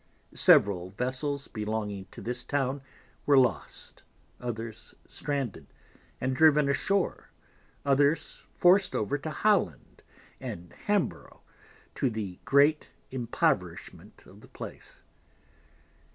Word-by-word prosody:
Several 95 Hz, -3 st, +5 dB
Vessels 130 Hz, +7 st, -2 dB
belonging 105 Hz, -3 st, -4 dB
to 95 Hz, -, -12 dB
this 125 Hz, +1 st, -3 dB
Town 140 Hz, -1 st, -1 dB, 0.5 s
were 145 Hz, -1 st, +6 dB
lost, 125 Hz, -2 st, 0 dB, 0.4 s
others 115 Hz, -2 st, -6 dB
stranded, 140 Hz, -7 st, -4 dB, 0.5 s
and 130 Hz, 0 st, -1 dB
driven 150 Hz, -1 st, +5 dB
ashoar, 195 Hz, +7 st, 0 dB, 0.6 s
others 140 Hz, +3 st, +2 dB
forced 190 Hz, +2 st, +4 dB
over 125 Hz, +8 st, -1 dB
to 155 Hz, -, -5 dB
Holland 180 Hz, -, 0 dB, 0.4 s
and 85 Hz, 0 st, -7 dB
Hamborough, 205 Hz, -3 st, -2 dB, 0.5 s
to 135 Hz, -, 0 dB
the 105 Hz, -5 st, -5 dB
great 145 Hz, +3 st, +4 dB, 0.2 s
Impoverishment 125 Hz, -3 st, -2 dB
of -, -, -16 dB
the -, -, -15 dB
Place. -, -, -10 dB
130 Hz, 100 wpm, -28 LUFS, 110-145 Hz, 0.6 s, were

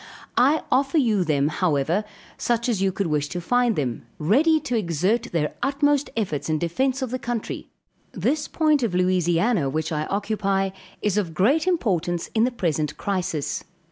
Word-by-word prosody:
I 280 Hz, +6 st, +4 dB
offer 270 Hz, +4 st, +2 dB
you 220 Hz, -9 st, +3 dB
them, 145 Hz, -3 st, +1 dB
however, 165 Hz, +2 st, +1 dB, 0.3 s
such 235 Hz, 0 st, 0 dB
as 220 Hz, -6 st, 0 dB
you 195 Hz, 0 st, +2 dB
could 195 Hz, +1 st, -2 dB
wish 150 Hz, -3 st, 0 dB
to 175 Hz, -, -4 dB
find 245 Hz, +5 st, +2 dB
them, 125 Hz, -5 st, -3 dB
ready 285 Hz, -, +3 dB
to 250 Hz, -, -2 dB
exert 195 Hz, +4 st, +1 dB
their 150 Hz, -3 st, 0 dB
utmost 290 Hz, +1 st, +1 dB
efforts 170 Hz, -9 st, -2 dB
in 155 Hz, -, +2 dB
defence 260 Hz, -, 0 dB
of 255 Hz, -, -4 dB
the 255 Hz, -, -2 dB
country. 240 Hz, -2 st, -4 dB, 0.4 s
This 295 Hz, 0 st, -1 dB
point 305 Hz, -3 st, +2 dB
of 220 Hz, -7 st, -1 dB
Louisiana, 180 Hz, -, +2 dB
which 155 Hz, +3 st, -2 dB
I 155 Hz, -1 st, -1 dB
occupy, 195 Hz, -1 st, 0 dB, 0.3 s
is 210 Hz, 0 st, +2 dB
of 170 Hz, -6 st, -4 dB
great 280 Hz, -, +3 dB
importance 180 Hz, -, 0 dB
in 225 Hz, +1 st, +3 dB
the 255 Hz, -, 0 dB
present 155 Hz, -, -1 dB
crisis. 180 Hz, -7 st, -2 dB
195 Hz, 170 wpm, -24 LUFS, 165-245 Hz, 0.4 s, I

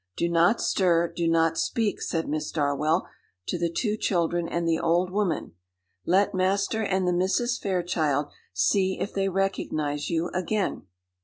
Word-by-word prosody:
"Do 170 Hz, -, +1 dB
not 170 Hz, +6 st, +3 dB
stir, 170 Hz, -3 st, +2 dB
do 170 Hz, -1 st, 0 dB
not 165 Hz, 0 st, +2 dB
speak," 225 Hz, -3 st, -1 dB
said 165 Hz, -1 st, -2 dB
Miss 155 Hz, 0 st, -2 dB
Darwell, 150 Hz, +3 st, 0 dB, 0.4 s
to 175 Hz, -, -2 dB
the 170 Hz, 0 st, +1 dB
two 210 Hz, +4 st, -1 dB
children 175 Hz, -4 st, 0 dB
and 170 Hz, 0 st, -2 dB
the 165 Hz, 0 st, +2 dB
old 175 Hz, +2 st, +1 dB
woman; 195 Hz, -5 st, -1 dB, 0.6 s
"let 195 Hz, +3 st, +3 dB
Master 195 Hz, +4 st, +1 dB
and 190 Hz, -2 st, 0 dB
the 180 Hz, -, +2 dB
Misses 200 Hz, +8 st, +1 dB
Fairchild 160 Hz, -6 st, 0 dB, 0.2 s
see 185 Hz, -, +1 dB
if -, -, -3 dB
they 195 Hz, 0 st, 0 dB
recognise 155 Hz, -6 st, -1 dB
you 170 Hz, +1 st, 0 dB
again." 185 Hz, -, -2 dB
175 Hz, 155 wpm, -26 LUFS, 165-195 Hz, 0.6 s, not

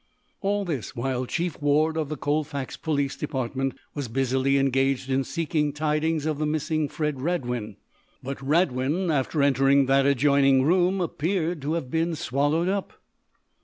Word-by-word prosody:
All 200 Hz, 0 st, 0 dB
this 140 Hz, -, -4 dB
while 125 Hz, +1 st, -2 dB
Chief 170 Hz, 0 st, -3 dB
Ward, 150 Hz, +2 st, +2 dB
of 155 Hz, -3 st, -2 dB
the 155 Hz, -, -4 dB
Colfax 145 Hz, -1 st, -2 dB
police 145 Hz, -4 st, -1 dB
department, 135 Hz, -2 st, -3 dB, 0.2 s
was 145 Hz, -3 st, -4 dB
busily 130 Hz, +3 st, +1 dB
engaged 135 Hz, 0 st, +1 dB
in 135 Hz, +1 st, +2 dB
seeking 150 Hz, -1 st, -1 dB
tidings 155 Hz, +1 st, 0 dB
of 155 Hz, -2 st, -1 dB
the 155 Hz, -, 0 dB
missing 155 Hz, 0 st, -1 dB
Fred 150 Hz, -3 st, -2 dB
Radwin. 125 Hz, -, -2 dB, 0.5 s
But 135 Hz, +1 st, -5 dB
Radwin, 150 Hz, +3 st, +1 dB
after 145 Hz, +1 st, +1 dB
entering 135 Hz, 0 st, +4 dB
that 135 Hz, +1 st, +3 dB
adjoining 140 Hz, -1 st, +4 dB
room, 180 Hz, +4 st, +2 dB
appeared 170 Hz, 0 st, -1 dB
to 145 Hz, +3 st, -2 dB
have 140 Hz, -7 st, -3 dB
been 165 Hz, +1 st, 0 dB
swallowed 145 Hz, +3 st, 0 dB
up. 195 Hz, 0 st, -2 dB
145 Hz, 150 wpm, -25 LUFS, 135-160 Hz, 0.5 s, entering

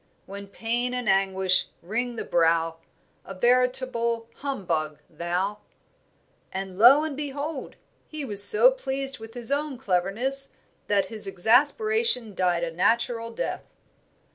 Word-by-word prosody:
When 200 Hz, +1 st, -9 dB
pain 240 Hz, +4 st, -2 dB
and 250 Hz, -3 st, -4 dB
anguish 190 Hz, -1 st, +2 dB, 0.2 s
wring 235 Hz, +6 st, -3 dB
the -, -, -5 dB
brow 165 Hz, -1 st, +1 dB, 0.5 s
A 195 Hz, -, -9 dB
veritable 240 Hz, 0 st, +2 dB
humbug 175 Hz, -, -3 dB
thou." 180 Hz, +6 st, -3 dB, 0.9 s
And 190 Hz, 0 st, -6 dB
lo 265 Hz, +7 st, +7 dB
and 310 Hz, -3 st, -4 dB
behold! 285 Hz, 0 st, -5 dB, 0.3 s
he 305 Hz, -2 st, -6 dB
was 205 Hz, -5 st, +6 dB
so 485 Hz, -, +6 dB
pleased 270 Hz, -, -4 dB
with 225 Hz, +1 st, -11 dB
his 240 Hz, +1 st, -2 dB
own 285 Hz, -1 st, -2 dB
cleverness 235 Hz, +6 st, -2 dB, 0.3 s
that 200 Hz, -2 st, +2 dB
his 215 Hz, -2 st, +2 dB
exasperation 255 Hz, -, +2 dB
died 180 Hz, -2 st, 0 dB
a 170 Hz, -, -3 dB
natural 230 Hz, +6 st, 0 dB
death. 225 Hz, -, -5 dB
230 Hz, 125 wpm, -25 LUFS, 190-265 Hz, 0.9 s, lo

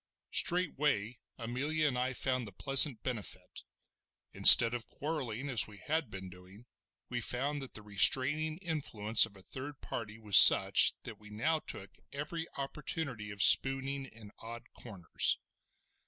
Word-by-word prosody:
Straightway 145 Hz, -, -1 dB, 0.2 s
Amelia 140 Hz, +7 st, -3 dB
and 130 Hz, -, -3 dB
I 125 Hz, +1 st, -4 dB
found 125 Hz, -2 st, -3 dB
the -, -, -12 dB
pleasant 135 Hz, +3 st, +4 dB
benefit; 120 Hz, -6 st, -6 dB, 0.7 s
instead 115 Hz, 0 st, +7 dB
of 120 Hz, -1 st, -6 dB
quarrelling, 140 Hz, -5 st, -7 dB
as 120 Hz, -8 st, -1 dB
we 105 Hz, -1 st, -16 dB
had 155 Hz, -, -4 dB
been 95 Hz, 0 st, -10 dB
doing, 90 Hz, +5 st, -17 dB, 0.4 s
we 120 Hz, -1 st, -5 dB
found 140 Hz, +5 st, -3 dB
that 135 Hz, -, -10 dB
the 110 Hz, -, -8 dB
restraining 135 Hz, +10 st, +1 dB
influence 115 Hz, -, 0 dB
of 100 Hz, -3 st, -20 dB
a 95 Hz, -, -16 dB
third 135 Hz, +7 st, -11 dB
party 110 Hz, -1 st, -9 dB
was 105 Hz, -3 st, +2 dB
such -, -, +6 dB
that -, -, -11 dB
we 105 Hz, 0 st, -16 dB
now 155 Hz, +10 st, -3 dB
took 95 Hz, -9 st, -8 dB, 0.2 s
every 160 Hz, +4 st, -7 dB
opportunity 140 Hz, -5 st, -7 dB
of 100 Hz, -1 st, -3 dB
spooning 135 Hz, 0 st, +3 dB
in 110 Hz, -4 st, -16 dB
odd 115 Hz, +1 st, -11 dB
corners. 95 Hz, -8 st, -3 dB
125 Hz, 145 wpm, -30 LUFS, 105-145 Hz, 0.7 s, instead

